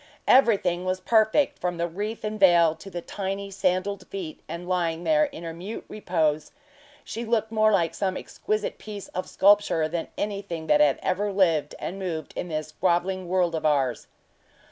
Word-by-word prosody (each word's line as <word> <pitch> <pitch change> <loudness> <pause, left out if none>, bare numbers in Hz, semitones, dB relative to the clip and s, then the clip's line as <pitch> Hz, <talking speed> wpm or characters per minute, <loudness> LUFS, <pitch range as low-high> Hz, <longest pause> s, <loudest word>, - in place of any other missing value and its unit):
Everything 195 -9 +4
was 185 0 -1
perfect, 220 +7 +2
from 175 -1 -2
the 170 0 0
wreath 205 +6 -5
and 215 0 -3
veil 170 -4 +6
to 165 +4 -11
the 175 -2 -6
tiny 195 0 -4
sandaled 190 +1 -1
feet 180 -6 -6
and 175 +1 -6
lying 170 -2 -1
there 305 - +4
in 280 - -9
her 165 -1 -5
mute 185 +7 -7
repose 160 -7 -1 0.5
she 230 - -5
looked 220 -1 0
more 215 -1 +4
like 170 -5 +2
some 190 -2 -1
exquisite 215 0 -3
piece 205 -2 -8
of 185 - -5
sculpture 200 -5 +4
than 165 +1 -3
anything 200 -6 -4
that 150 -1 +4
had 145 -2 +4
ever 205 +2 0
lived 165 -7 +2
and 195 - -5
moved 165 -6 -4
in - - -3
this 155 -1 -4
groveling 185 +1 +1
world 180 -1 +1
of 160 -1 -2
ours. 135 -6 +1
185 Hz, 175 wpm, -26 LUFS, 165-205 Hz, 0.5 s, veil